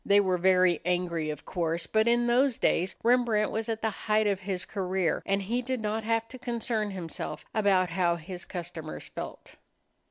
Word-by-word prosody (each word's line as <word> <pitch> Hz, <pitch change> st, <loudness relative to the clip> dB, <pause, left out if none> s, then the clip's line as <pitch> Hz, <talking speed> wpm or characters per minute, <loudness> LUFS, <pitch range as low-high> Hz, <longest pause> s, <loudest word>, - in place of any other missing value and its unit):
They 200 Hz, 0 st, +5 dB
were 185 Hz, -3 st, +2 dB
very 185 Hz, -1 st, +4 dB
angry, 175 Hz, -3 st, 0 dB
of 150 Hz, -1 st, -6 dB
course, 170 Hz, -2 st, -1 dB
but 220 Hz, +1 st, +2 dB
in 240 Hz, 0 st, +3 dB
those 245 Hz, +1 st, +3 dB
days 185 Hz, +2 st, +1 dB
Rembrandt 235 Hz, -3 st, +3 dB
was 220 Hz, +1 st, -2 dB
at 225 Hz, -1 st, -3 dB
the 220 Hz, -, +1 dB
height 215 Hz, +1 st, +1 dB
of 200 Hz, -2 st, +1 dB
his 190 Hz, -1 st, -3 dB
career 190 Hz, -3 st, -1 dB
and 195 Hz, 0 st, +1 dB
he 235 Hz, +6 st, -1 dB
did 255 Hz, 0 st, -2 dB
not 220 Hz, +1 st, -2 dB
have 225 Hz, +1 st, 0 dB
to 255 Hz, -, -10 dB
concern 235 Hz, -3 st, -1 dB
himself 180 Hz, -5 st, -5 dB
about 190 Hz, -4 st, +3 dB
how 170 Hz, -1 st, +2 dB
his 175 Hz, +2 st, -7 dB
customers 170 Hz, -3 st, -6 dB
felt. -, -, -8 dB
200 Hz, 185 wpm, -28 LUFS, 180-225 Hz, -, They